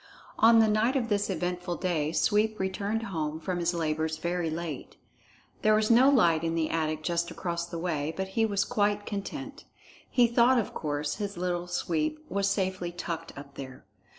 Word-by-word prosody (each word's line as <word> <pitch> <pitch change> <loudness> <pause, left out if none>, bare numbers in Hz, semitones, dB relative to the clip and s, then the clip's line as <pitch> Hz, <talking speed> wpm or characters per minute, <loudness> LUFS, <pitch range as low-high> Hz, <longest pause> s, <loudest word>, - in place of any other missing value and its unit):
On 230 +1 +7
the 225 -1 +6
night 215 +5 +2
of 240 -4 0
this 205 -1 +1
eventful 180 0 -2
day 160 -5 -1
Sweep 215 +4 +2
returned 200 +4 -1
home 160 -7 -3
from 175 +2 -3
his 170 0 +1
labors 160 -1 -1
very 170 0 -1
late. 160 -3 -5 0.6
There 215 0 +4
was 215 +1 +2
no 250 +4 +7
light 170 - +4
in 165 0 -1
the 160 -1 0
attic 155 -1 -1
just 170 0 0
across 170 -1 -3
the 170 -1 -6
way, 160 -3 -2
but 190 0 -2
he 225 +4 +1
was 200 -3 +1
quite 205 0 0
content. 270 +8 -6 0.4
He 245 -2 +4
thought, 235 +2 +4
of 230 - -1
course, 145 -1 -2
his 200 -3 -4
Little 175 0 -2
Sweep 175 - -2
was 200 0 +1
safely 185 -3 -1
tucked 165 -2 -6
up 140 0 -10
there. 130 -2 -9
180 Hz, 180 wpm, -28 LUFS, 165-210 Hz, 0.6 s, On